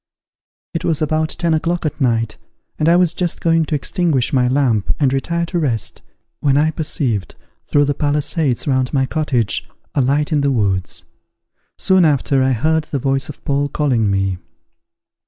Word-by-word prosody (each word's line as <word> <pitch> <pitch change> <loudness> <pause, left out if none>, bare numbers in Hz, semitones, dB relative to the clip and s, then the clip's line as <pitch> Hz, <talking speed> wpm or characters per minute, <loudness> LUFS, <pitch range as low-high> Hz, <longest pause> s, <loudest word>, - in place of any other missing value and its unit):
It 165 +1 -3
was 165 -4 +1
about 155 +1 0
ten 170 -1 -1
o'clock 170 +2 -1
at 155 0 -3
night, 115 -3 0 0.4
and 155 - +3
I 170 - +5
was 180 -2 +4
just 175 -1 -2
going 165 -1 +2
to 155 - -2
extinguish 145 -4 0
my 125 -2 +3
lamp, 125 -6 +1
and 135 -3 +2
retire 170 +5 -1
to 175 +1 -2
rest, 120 -9 -1 0.4
when 140 -1 +2
I 155 +2 +3
perceived, 130 - -2 0.3
through 145 0 +3
the 145 - 0
palisades 145 -1 0
round 130 -2 0
my 135 -1 +2
cottage, 130 -7 -1 0.2
a 140 - +2
light 145 +4 +1
in 150 -2 +2
the 140 0 +1
woods. 95 -7 -1 0.7
Soon 190 -1 +4
after, 140 -3 +2
I 130 0 +2
heard 155 +6 +1
the 145 - -3
voice 135 +1 -1
of 145 - -11
Paul 140 0 0
calling 125 -8 +1
me. 95 -2 0
145 Hz, 175 wpm, -18 LUFS, 130-160 Hz, 0.7 s, I